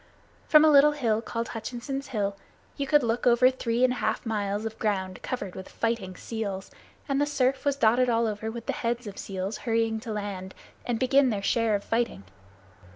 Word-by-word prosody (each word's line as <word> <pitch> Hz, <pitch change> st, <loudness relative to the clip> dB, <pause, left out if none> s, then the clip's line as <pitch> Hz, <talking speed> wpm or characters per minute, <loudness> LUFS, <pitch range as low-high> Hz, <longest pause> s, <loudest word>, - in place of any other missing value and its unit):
From 305 Hz, 0 st, +7 dB
a 310 Hz, -, +6 dB
little 295 Hz, +1 st, +7 dB
hill 230 Hz, -7 st, 0 dB
called 230 Hz, 0 st, -4 dB
Hutchinson's 255 Hz, +4 st, -5 dB
Hill, 200 Hz, -4 st, -2 dB, 0.4 s
you 280 Hz, -1 st, -3 dB
could 295 Hz, -1 st, +4 dB
look 235 Hz, +1 st, 0 dB
over 245 Hz, +2 st, +6 dB
three 240 Hz, -1 st, -1 dB
and 255 Hz, -1 st, +4 dB
a -, -, -6 dB
half -, -, -1 dB
miles 205 Hz, -1 st, -2 dB
of 220 Hz, 0 st, -5 dB
ground 190 Hz, -3 st, -2 dB
covered 200 Hz, -8 st, -4 dB
with 190 Hz, -, -9 dB
fighting 225 Hz, -5 st, -2 dB
seals; 200 Hz, -4 st, -5 dB, 0.4 s
and 275 Hz, -1 st, +1 dB
the 290 Hz, -, +2 dB
surf 270 Hz, -2 st, 0 dB
was 285 Hz, -1 st, +2 dB
dotted 245 Hz, -1 st, +3 dB
all 230 Hz, 0 st, +2 dB
over 220 Hz, 0 st, -3 dB
with 230 Hz, 0 st, -7 dB
the -, -, -1 dB
heads 235 Hz, +1 st, -2 dB
of 200 Hz, -1 st, -8 dB
seals 190 Hz, +1 st, -4 dB
hurrying 225 Hz, -1 st, 0 dB
to 225 Hz, 0 st, -7 dB
land 200 Hz, -3 st, -5 dB, 0.3 s
and 240 Hz, -2 st, 0 dB
begin 265 Hz, +1 st, +4 dB
their 205 Hz, -4 st, -2 dB
share 225 Hz, 0 st, +2 dB
of 200 Hz, -, -3 dB
the -, -, -23 dB
fighting. 230 Hz, -, 0 dB
230 Hz, 205 wpm, -27 LUFS, 210-255 Hz, 0.4 s, From